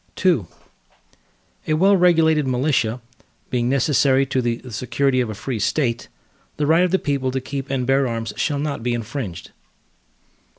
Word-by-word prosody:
II 165 - +3 1.2
A 155 - +2
well 195 +5 +4
regulated 160 -5 +3
militia, 125 -3 0 0.5
being 120 -1 0
necessary 135 0 +3
to 130 -1 -1
the 120 -1 -1
security 130 +3 0
of 120 - -2
a 110 - -5
free 120 +2 -4
State, 120 +2 -1 0.5
the 150 - 0
right 165 +4 +4
of 180 - +2
the 190 - +2
people 140 -6 -1
to 130 +1 -2
keep 135 +1 -6
and 130 -2 -1
bear 135 +1 +2
arms, 115 -1 -4
shall 145 -3 -1
not 145 -2 -3
be 120 +1 -1
infringed. 115 - -6
135 Hz, 160 wpm, -21 LUFS, 120-150 Hz, 1.2 s, well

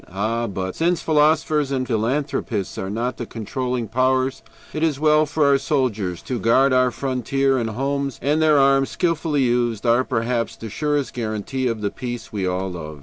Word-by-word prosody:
Ah! 110 +5 -1
but 95 -1 -4
since 170 +1 +1
philosophers 155 -1 +2
and 130 -2 0
philanthropists 115 -3 -1
are 95 - -4
not 120 +5 -2
the 120 - -5
controlling 125 +1 -3
powers, 130 +3 +1 0.3
it 155 - -3
is 155 -4 +1
well 155 0 +4
for 150 0 +1
our 140 -1 +4
soldiers 115 - -1
to 125 -2 -3
guard 130 +6 +3
our 130 0 +4
frontier 135 +1 0
and 115 -2 -2
homes, 140 +3 -2
and 150 +4 +1
their 155 -2 +5
arms, 135 0 +4
skillfully 160 -5 0
used, 120 -2 0
are 120 +2 +4
perhaps 115 -1 -1
the 110 -2 -8
surest 145 +1 -1
guarantee 120 +3 -2
of 115 -3 -2
the 100 - -1
peace 120 -2 -6
we 95 -3 -1
all 95 +1 -2
love. 75 -4 -7
130 Hz, 180 wpm, -22 LUFS, 115-140 Hz, 0.3 s, their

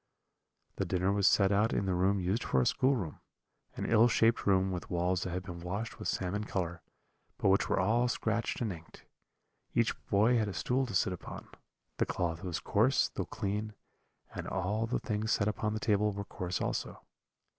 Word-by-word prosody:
"The - - 0
dinner 95 +1 +1
was 100 0 +3
set 100 -2 +4
out 105 +3 +2
in 100 - 0
the 95 - 0
room 95 +3 +2
used 95 +5 0
for 65 - +1
a 65 - +2
schoolroom; 130 - +1 0.6
an - - -3
ill 115 +1 +5
shaped 115 -1 +2
room, 95 -1 +3
with 90 -1 -5
walls 90 +1 0
that - - -3
had 90 +1 -3
been 90 -2 -7
washed 100 +6 -4
with - - -4
salmon 100 +3 -1
colour, 85 -4 -3 0.6
but - - +2
which 100 +3 +3
were 100 - +2
all 115 +6 +2
scratched 115 -1 -1
and 110 -5 -1
inked. 80 -1 -14 0.7
Each - - +3
boy 110 +4 +4
had 110 - 0
a 100 - -4
stool 125 +9 0
to 105 - -5
sit 90 +1 +2
upon; 90 - -9 0.5
the - - +1
cloth 85 -1 -2
was 90 -3 -2
coarse, - - +2
though - - -4
clean, 105 +2 -3 0.6
and - - -5
all 105 +5 -1
the 120 - 0
things 110 -1 -1
set 100 - +1
upon 105 0 -1
the - - -2
table 105 -1 +2
were 100 0 -5
coarse 90 -2 -4
also. - - -3
100 Hz, 195 wpm, -32 LUFS, 90-110 Hz, 0.7 s, ill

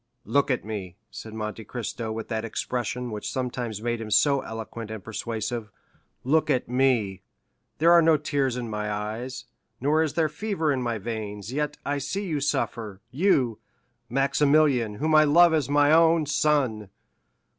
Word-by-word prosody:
"Look 140 0 +2
at 130 -5 0
me," 100 -5 -5 0.2
said 110 0 -9
Monte 110 0 -5
Cristo, 115 0 -4
with 110 0 -5
that 110 -1 -2
expression 120 +1 -3
which 105 -1 -4
sometimes 120 -4 -3
made 120 -1 -1
him 110 - -6
so 140 +6 +4
eloquent 115 0 -7
and 110 -3 -7
persuasive—"look 115 +6 -3
at 125 - +1
me. 120 -7 +1 0.6
There 165 +2 +5
are 170 0 +8
no 160 -1 +5
tears 140 -4 -1
in 120 -1 -4
my 105 -1 -3
eyes, 110 +5 -4 0.3
nor 150 +5 +2
is 160 -2 -1
there 160 -2 +3
fever 165 -2 -1
in 130 -2 0
my 120 -2 -1
veins, 105 0 -5
yet 150 +1 -2
I 145 0 -1
see 195 +9 -3
you 155 -5 -1
suffer—you, 120 - 0 0.5
Maximilian, 140 -3 +2
whom 155 +8 0
I 155 0 +7
love 165 +3 +6
as 150 -4 +1
my 145 0 +4
own 165 0 +5
son. 135 -8 +1
125 Hz, 155 wpm, -26 LUFS, 110-150 Hz, 0.6 s, are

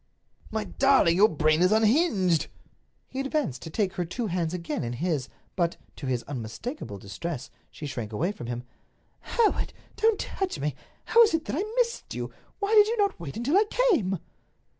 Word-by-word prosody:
"My 220 -1 -2
darling, 270 -12 +4
your 210 +4 +6
brain 155 +1 +2
is 185 +2 +5
unhinged!" 215 - +3 0.6
He 260 - -6
advanced 275 - -1
to 165 - -7
take 190 +2 0
her 180 - -1
two 175 +8 -3
hands 175 -4 -1
again 170 -4 -3
in 120 0 -3
his; 145 -1 -1 0.3
but, 170 -2 0 0.2
to 140 - -5
his 125 -2 0
unmistakable 125 - -6
distress, 125 - -6 0.2
she 150 - -8
shrank 120 -6 -4
away 165 - 0
from 125 - -8
him. 120 0 -4 0.6
"Hereward—don't 445 -1 0
touch 385 -2 -3
me. 150 +1 -1 0.3
How 465 - +6
is 435 -8 +6
it 320 - -2
that - - -2
I 355 - 0
missed 485 -1 0
you? - - -4 0.2
Why 405 +1 -1
did 420 -1 +8
you 465 +2 -1
not 405 -2 +1
wait 160 0 -6
until 255 +8 +1
I 420 - +5 0.3
came?" 195 - +2
185 Hz, 180 wpm, -27 LUFS, -, 0.6 s, did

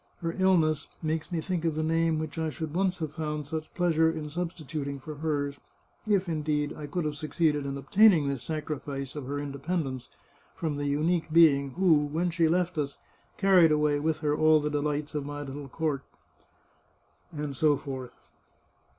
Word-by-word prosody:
Her 165 -1 -2
illness 160 -6 +3 0.2
makes 160 +2 -2
me 170 -2 -1
think 175 -1 -2
of 165 -2 0
the 155 - -1
name 165 0 +2
which 155 +1 -4
I 160 -1 0
should 155 0 -5
once 185 +1 +1
have 155 -3 -4
found 150 -2 -3
such 155 +2 -5
pleasure 165 -3 +3
in 150 -2 -6
substituting 155 -4 -4
for 155 +3 -7
hers 145 -2 -2 0.3
— - - -40
if, 195 -3 +2
indeed, 150 -2 -1
I 150 - -7
could 165 +3 -2
have 150 -1 -2
succeeded 150 -1 0
in 140 0 -3
obtaining 165 - +5
this 140 -3 -2
sacrifice 145 -2 -4
of 145 -4 -5
her 145 +1 -3
independence 140 -2 -3 0.5
from 155 -4 -2
the 145 0 -2
unique 160 +3 0
being 140 -5 +5
who, 180 -2 +4
when 170 +4 -1
she 165 -1 +2
left 175 0 +1
us, 140 -1 -3 0.4
carried 185 -5 +6
away 150 -1 +2
with 155 +1 -1
her 150 -1 +1
all 155 0 +5
the 150 0 -2
delights 150 0 -1
of 150 -2 -2
my 145 +1 -5
little 140 0 -7
court," 150 -2 -1 1.3
and 150 -3 -4
so 150 +1 +3
forth. 130 -3 -6
155 Hz, 180 wpm, -28 LUFS, 145-165 Hz, 1.3 s, carried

